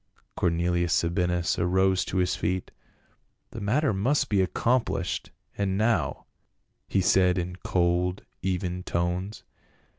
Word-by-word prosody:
Cornelius 85 0 +1
Sabinus 90 0 +1
arose 95 +1 +2
to 95 - -3
his 90 0 +1
feet. 90 +2 -2 0.8
"The 115 - -7
matter 125 +6 +1
must 135 +8 +1
be 100 -2 +3
accomplished, 115 +6 0 0.3
and 95 -1 -1
now," 110 +2 0 0.6
he 95 - +1
said 90 0 +3
in 90 0 -3
cold 90 +1 0 0.2
even 90 -1 -2
tones. 90 +4 -2
90 Hz, 115 wpm, -27 LUFS, 90-100 Hz, 0.8 s, be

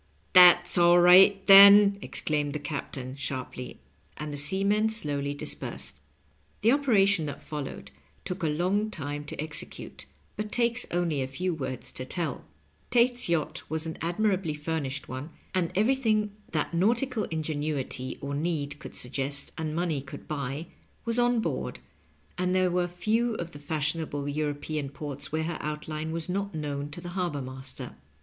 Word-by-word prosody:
" - - -38
That's 175 -1 +7
all 175 0 +6
right, 190 +3 +7
then," 200 0 +9
exclaimed 145 -6 -1
the - - -1
captain, 140 -3 -5
sharp 130 -2 -5
ly; 125 0 -7 0.4
and 150 -1 -5
the - - -4
seamen 200 +8 +1
slowly 145 -9 -2
dispersed. 70 - -5 0.6
The 225 - +5
operation 205 - +3
that 145 - -6
followed 135 - -7 0.3
took 185 +1 -4
a 165 - +1
long 185 +8 0
time 145 -5 -5
to - - -8
exe 155 0 -1
cute, - - -10 0.3
but 210 0 -4
takes 235 -1 +1
only 170 -5 0
a 130 - -2
few 175 +7 -2
words 130 -5 -5
to 130 - -5
tell. 170 +5 -3 0.4
Tate's 245 -2 +2
yacht 160 0 -1
was 160 +1 -2
an 160 - -6
admirably 180 -2 0
furnished 150 -3 -3
one, 130 +4 -6 0.2
and 180 -3 0
everything 215 -1 +2 0.2
that 155 +1 -1
nautical 225 +6 +1
ingenuity 150 -5 -3
or 140 0 -4
need 150 -1 -2
could - - -10
suggest 140 +2 -2
and 155 -1 -3
money 165 -5 -1
could 140 - -10
buy, 140 +1 -4 0.4
was 230 +1 0
on 240 -1 +3
board, - - -3 0.6
and 180 0 +1
there 185 -1 +3
were 175 0 +1
few 220 +6 0
of 170 -3 -5
the 145 - -11
fashionable 150 -1 -2
European 145 0 -2
ports 140 -1 -6
where 160 +1 0
her 165 0 -3
outline 155 +1 -4
was 165 0 -3
sot 195 +1 -3
known 145 -2 -3
to 155 +4 -8
the 175 - -7
harbor 175 -5 -2
master. 130 +1 -7
160 Hz, 160 wpm, -28 LUFS, 145-195 Hz, 0.6 s, then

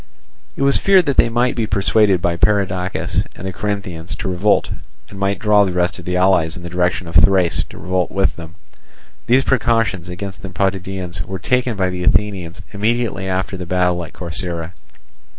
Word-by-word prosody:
It - - -2
was 140 0 +4
feared 190 -3 +4
that 140 -3 -1
they - - +5
might 120 +2 +1
be 115 -2 -1
persuaded 100 -2 +2
by 85 -1 +1
Perdiccas 95 0 0
and 95 - -9
the 95 - -3
Corinthians 95 -4 -4
to - - -5
revolt, 95 +3 +1 0.4
and 100 - -9
might 100 0 0
draw 105 -1 +4
the 95 -2 -1
rest 90 +1 0
of 90 - -11
the 90 0 -1
allies 90 -3 +2
in 85 - -9
the 85 - -7
direction 90 0 0
of 85 - -8
Thrace 95 -1 +4
to - - -12
revolt 90 +2 -1
with 95 0 0
them. 80 -1 -10 0.7
These 130 +2 +4
precautions 115 -9 +1
against 95 +2 -7
the 95 - -7
Potidæans 95 -1 -2
were 95 +2 -5
taken 125 +3 0
by 95 -1 +1
the 90 0 -4
Athenians 90 -2 0
immediately 105 -2 -1
after 95 +1 -2
the 90 -1 -7
battle 90 -1 +1
at 80 - -9
Corcyra. 85 -1 -4
95 Hz, 185 wpm, -19 LUFS, 90-105 Hz, 0.7 s, they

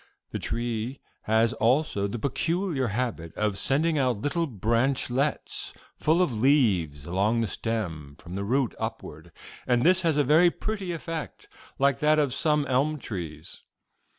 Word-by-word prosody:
This - - -3
tree 120 +2 -3 0.3
has 110 +1 +3
also 115 -4 +1
the 100 - -4
peculiar 160 - -1
habit 105 -7 -3
of 105 -2 0
sending 150 +8 +1
out 125 -6 +1
little 165 +3 0
branchlets 125 +4 0 0.2
full 165 +4 +3
of 145 - -1
leaves 105 - +2
along 100 +7 +1
the 115 - 0
stem 85 -9 -4
from 85 - -11
the 100 +1 -3
root 125 +4 +1
upward, 85 -8 -6 0.4
and 120 -1 +3
this 185 +3 +4
has 165 -4 +1
a 145 - +4
very 155 +6 +5
pretty 200 0 -4
effect, 165 -1 -6 0.3
like 140 -2 +2
that 155 +1 +4
of 145 -5 +2
some 150 0 +1
elm 140 +4 +1
trees. 90 - -7
125 Hz, 150 wpm, -27 LUFS, 105-150 Hz, 0.4 s, very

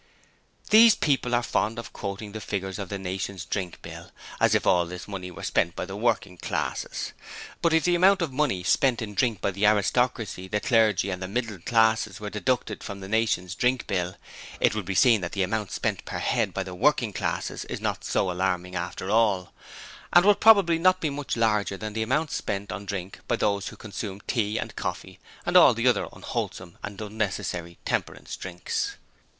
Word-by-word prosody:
These 220 +1 +8
people 130 -5 +1
are 120 - +1
fond 115 -1 0
of 115 - -7
quoting 100 +1 -5
the 110 +1 -6
figures 95 -1 -4
of 100 -3 -5
the 100 - -3
'Nation's 95 -1 -4
Drink 90 -1 -4
Bill,' - - -9 0.3
as - - +4
if - - +1
all 90 -1 +3
this 90 +1 -8
money 95 -3 -6
were 90 - -10
spent 85 - +1
by - - -3
the 95 - -7
working 105 -4 0
classes! - - -3 0.5
But 170 - +3
if 160 0 +3
the 175 - +3
amount 185 +1 +5
of 150 -6 -3
money 130 -10 0
spent 125 +4 +2
in 105 -2 -6
drink 115 -4 +1
by 100 - 0
the 100 +2 +2
'aristocracy', 105 -2 +1
the 105 +2 -1
clergy 110 -4 +2
and 90 0 -4
the 95 - -3
middle 110 -1 -3
classes 110 0 +2
were 105 -1 -6
deducted 110 -1 -1
from 100 -1 -6
the 95 - -8
'Nation's 105 -4 0
Drink 125 +4 +1
Bill', 90 -3 -2 0.4
it - - +3
would 110 -3 -3
be 95 +1 -3
seen 115 -1 +5
that 85 - -4
the 100 - +1
amount 105 +1 -2
spent - - -2
per - - -5
head - - 0
by 95 - -2
the 95 -1 -8
working 115 +2 +2
classes - - -2
is - - -5
not - - -2
so 95 - 0
alarming 90 0 -1
after 90 +2 -4
all; 105 -5 +2 0.6
and 175 +2 +6
would 205 0 +5
probably 200 -7 +6
not 185 +2 +4
be 155 -4 -1
much 140 -3 -3
larger 105 -3 +1
than 110 0 -5
the 110 - -2
amount 140 +7 0
spent 100 0 -3
on 100 -1 -6
drink 95 -1 -5
by - - +2
those 100 -1 0
who - - -7
consume 100 -2 -6
tea 110 -2 -1
and - - -4
coffee - - -5 0.3
and - - -1
all - - +8
the - - +1
other - - +3
unwholesome 90 -2 -5
and 105 -1 -7
unnecessary 100 -5 -3
'temperance' - - -3
drinks. 90 -1 -3
105 Hz, 200 wpm, -26 LUFS, 95-120 Hz, 0.6 s, These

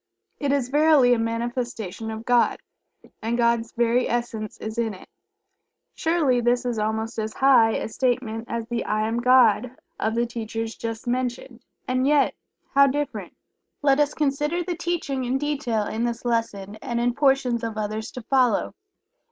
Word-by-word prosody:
It 285 -2 0
is 275 -3 0
verily 295 -3 +5
a 240 - +1
manifestation 230 -2 -3
of 220 +1 -6
God, 245 -1 +3 0.6
and 230 +2 -1
God's 235 -1 +1
very 240 +1 +1
essence 230 -3 -3
is 220 +2 -5
in 225 -3 -1
it. 185 - -14 0.9
Surely 315 -7 +1
this 245 +1 +1
is 240 -3 -1
almost 220 +2 -2
as 220 0 -3
"high" 255 -5 +5
a - - -2
statement 235 -2 -1
as 230 -2 -4
the 235 0 -2
"I 215 +1 0
Am 230 +1 -1
God" 250 -1 +4 0.2
of 220 +1 0
the 235 +1 +2
teachers 225 -1 -4
just 225 0 -5
mentioned, 250 0 -3 0.3
and 255 +1 +1
yet 290 -1 +3 0.4
how 280 0 +6
different. 290 +2 -3 0.5
Let 275 0 +4
us 295 0 +2
consider 295 +4 0
the 350 0 -3
teaching 330 -6 -2
in 250 +2 0
detail 270 -7 -1
in 220 +3 -3
this 240 0 -3
lesson, 215 -4 -2
and 235 +2 -3
in 240 0 +1
portions 265 -4 +2
of 225 -1 -4
others 215 +1 -3
to 250 - -7
follow. 250 -3 +2
240 Hz, 165 wpm, -24 LUFS, 225-265 Hz, 0.9 s, how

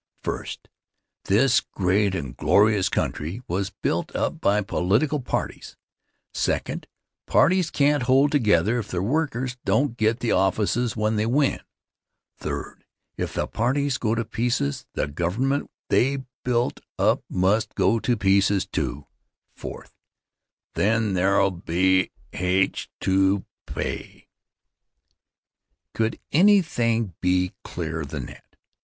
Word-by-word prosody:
First, - - -5 0.6
this 120 +6 +4
great 95 +1 0
and 70 -8 -5
glorious 105 -2 +3
country 85 +11 -2
was 95 +3 -1
built - - -3
up - - -1
by 105 +1 +3
political 105 +10 +1
parties; 125 - -4 0.6
second, - - -2 0.4
parties 185 -2 +3
can't 145 0 +2
hold 135 +3 +4
together 110 - +3
if 110 - -5
their 90 0 -2
workers 130 -1 -1
don't 140 -4 +1
get 110 +2 +1
the 120 - -1
offices 110 +5 +1
when 110 0 +1
they 105 +1 +1
win; 135 +3 +2 0.8
third, - - -5 0.3
if - - -4
the - - 0
parties 130 +4 0
go 110 -1 0
to 115 0 -1
pieces, 115 -12 -1
the - - 0
government 90 - -1 0.2
they 135 +1 +2 0.2
built 120 -1 0 0.2
up - - +2
must 95 +5 +1
go 110 +5 +2
to 120 +1 0
pieces, 100 0 +3
too; 75 -7 -3 0.5
fourth, - - -9 0.8
then 110 -1 +1
there'll 100 +1 +3
be 90 +2 +1 0.2
h 90 +1 0
to 95 +1 +2 0.2
pay. - - -5 1.7
Could 110 0 -1
anything 120 - +3
be 90 0 +1
clearer 80 -2 -4
than 70 - -5
that? - - -14
110 Hz, 120 wpm, -24 LUFS, 95-125 Hz, 1.7 s, this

